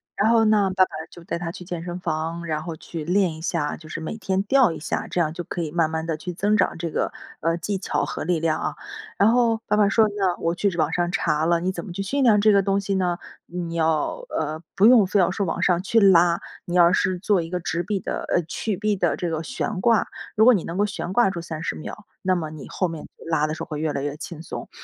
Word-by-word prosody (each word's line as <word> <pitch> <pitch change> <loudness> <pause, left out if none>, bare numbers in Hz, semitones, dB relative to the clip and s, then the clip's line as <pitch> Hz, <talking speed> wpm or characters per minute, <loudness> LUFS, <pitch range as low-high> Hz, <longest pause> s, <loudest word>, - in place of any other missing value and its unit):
然 210 +2 +2
后 225 -1 +5
那 210 -2 +4
爸 185 0 +4
爸 - - -19 0.2
就 170 - -13
带 170 - -4
他 170 -1 -4
去 180 - -10
健 170 -2 -5
身 175 +1 -5
房 165 0 -3
然 155 -2 -2
后 170 -2 -5
去 160 0 -7
练 180 +1 +2
一 160 - -10
下， 150 -3 -1
就 155 -1 -13
是 165 - -5
每 160 - -5
天 195 -3 -1
吊 255 -2 +4
一 - - -6
下， 160 - -3
这 - - -2
样 155 -2 +1
就 175 +1 -5
可 175 - -4
以 155 - -4
慢 165 -2 +2
慢 160 0 -3
地 165 -1 -1
去 180 +3 -5
增 205 +5 +1
长 - - +1
这 165 -1 -4
个， - - -1 0.3
呃， 165 +1 0
技 195 +4 -3
巧 185 - -1
和 - - -4
力 175 0 +1
量 160 -1 0
啊。 - - -2 0.4
然 205 +3 +5
后 235 -2 +3
爸 210 - +1
爸 210 -1 +4
说 220 +1 +4
那 190 -3 +1
我 165 - 0
去 200 +3 +1
网 160 0 +1
上 175 0 0
查 150 -2 +1
了 170 -1 +3
你 185 +2 -1
怎 170 -2 -6
么 - - -8
去 195 +3 -3
训 275 +7 0
练 215 -4 +5
这 215 +1 +5
个 200 -1 +5
东 195 0 +1
西 200 0 -2
呢？ 180 -2 0 0.3
你 170 -1 -5
要， 160 - 0
呃， 155 +1 -3
不 195 +2 +4
用 230 -5 +7
非 200 - +2
要 180 -1 +3
说 195 -1 -1
往 - - -2
上 175 -1 +3
去 225 +4 +2
拉， 175 -4 +5 0.3
你 175 - -3
要 175 0 +6
是 185 -1 +1
做 195 0 +2
一 165 - -6
个 180 0 -2
直 170 0 -2
臂 195 +2 -2
的 - - -4
呃， 175 - +2
曲 190 +5 -3
臂 210 +1 0
的 185 - +1
这 175 -2 -2
个 160 -1 -2
悬 215 -3 -3
挂。 230 +1 +3 0.3
如 220 - +5
果 250 - +8
你 195 - 0
能 170 - -5
够 205 - +3
悬 185 -3 -4
挂 195 -2 +3
住 175 -3 -5
30 160 -1 -4
秒， 205 +6 -8 0.2
那 185 -1 +2
么 155 -3 -3
你 155 -2 -9
后 185 - 0
面 165 -2 -6
就 - - -14
拉 160 -2 +1
的 155 - -3
时 - - -5
候 - - -8
会 150 - -5
越 155 -1 0
来 140 - -3
越 145 0 -3
轻 160 +1 -8
松。 - - -7
175 Hz, 295 characters per minute, -23 LUFS, 165-200 Hz, 0.4 s, 果